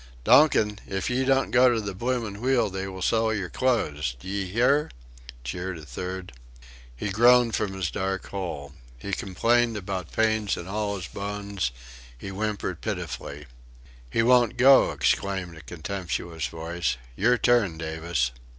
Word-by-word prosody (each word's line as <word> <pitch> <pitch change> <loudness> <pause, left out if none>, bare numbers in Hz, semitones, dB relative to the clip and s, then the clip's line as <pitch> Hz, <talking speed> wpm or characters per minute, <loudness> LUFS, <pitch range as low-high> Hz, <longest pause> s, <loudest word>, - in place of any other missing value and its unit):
"Donkin, 105 - +5
if 95 +4 -2
ye 130 +2 +1
don't 135 0 +2
go 125 0 +6
to 115 - +1
the 100 -2 -4
bloomin' 115 -1 -2
wheel 125 -5 +2
they 95 0 -4
will 95 -1 -6
sell 110 +1 +2
your 100 -5 -3
clothes 75 - 0
d'ye 95 +5 -3
hear?" 125 +9 +2 0.5
jeered 90 +8 -4
a 80 - -10
third. 90 0 -6 0.6
He 100 - -3
groaned 120 +3 +5
from 105 -3 -1
his 95 -4 -2
dark 95 0 -2
hole. 75 -8 -5 0.2
He 80 +11 -6
complained 115 +5 +1
about 95 -4 -5
pains 110 -2 +1
in 90 - -7
all 105 +1 -2
his 90 - -6
bones, 100 -7 -3 0.5
he 95 - -7
whimpered 105 +1 -3
pitifully. 75 +1 -5 0.6
"He 115 - +1
won't 120 -1 +4
go," 135 +2 +7
exclaimed 95 -3 0
a 80 - -11
contemptuous 85 -1 -4
voice, 80 -5 -3 0.2
"your 120 - +3
turn, 115 -10 +2
Davis." 80 -5 -1
100 Hz, 150 wpm, -26 LUFS, 85-115 Hz, 0.6 s, go